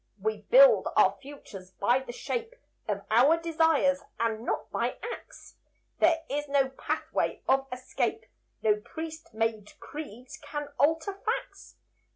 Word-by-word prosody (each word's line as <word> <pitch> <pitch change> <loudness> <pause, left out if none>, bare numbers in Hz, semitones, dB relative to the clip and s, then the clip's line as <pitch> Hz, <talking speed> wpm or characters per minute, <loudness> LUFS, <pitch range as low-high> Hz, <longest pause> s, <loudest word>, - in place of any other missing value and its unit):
We 435 0 -2
build - - +7
our - - +5
futures, 235 -10 -11
by 240 +6 +2
the 265 -2 -8
shape 460 - -4 0.3
Of 200 -2 -2
our 265 +9 +6
desires, 320 -4 +2 0.2
and 225 -1 0
not - - -3
by - - -1
acts. 475 - -9 0.4
There 325 0 +4
is 295 +1 -2
no 280 -1 +2
pathway 265 - -2
of 270 0 +3
escape; 250 0 -2 0.4
No 215 -1 +4
priest 320 +7 -8
made 220 -2 -2
creeds 255 -5 -9
can 295 0 -5
alter 320 +7 +2
facts. 440 +4 -4
285 Hz, 135 wpm, -28 LUFS, 240-325 Hz, 0.4 s, build